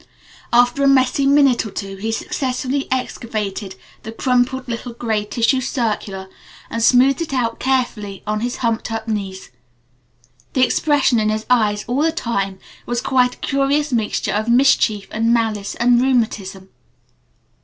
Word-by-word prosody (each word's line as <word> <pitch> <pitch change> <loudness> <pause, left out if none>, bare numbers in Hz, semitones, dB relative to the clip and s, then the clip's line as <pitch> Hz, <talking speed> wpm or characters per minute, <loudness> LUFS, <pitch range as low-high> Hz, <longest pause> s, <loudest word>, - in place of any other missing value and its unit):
After 245 +3 +3
a - - +4
messy 275 0 +3
minute 275 -3 +4
or 220 - -6
two 195 -1 -6
he 220 +3 -3
successfully 260 +3 -2
excavated 215 -6 -3 0.3
the 220 - -8
crumpled 255 +2 0
little 235 0 -5
gray 220 -3 -2
tissue 235 +4 +1
circular 215 -6 -3 0.4
and 230 - -2
smoothed 255 +5 +4
it 310 -5 -3
out 230 -3 -1
carefully 240 -7 -2
on 215 0 -1
his 240 +2 -2
humped 230 0 -1
up 225 0 -4
knees. 195 -3 -4 1.0
The 260 -1 +4
expression 280 -4 +2
in 215 0 +1
his 215 0 -2
eyes 210 -4 +2
all 250 +4 0
the 325 +1 +2
time 200 - -2 0.3
was 240 0 -1
quite 250 0 +1
a - - -6
curious 275 +1 0
mixture 220 -3 -1
of 215 +3 -1
mischief 235 -5 +3
and 225 +1 +1
malice 220 -4 0
and 240 0 +3
rheumatism. 210 -7 -1
235 Hz, 150 wpm, -19 LUFS, 215-260 Hz, 1.0 s, a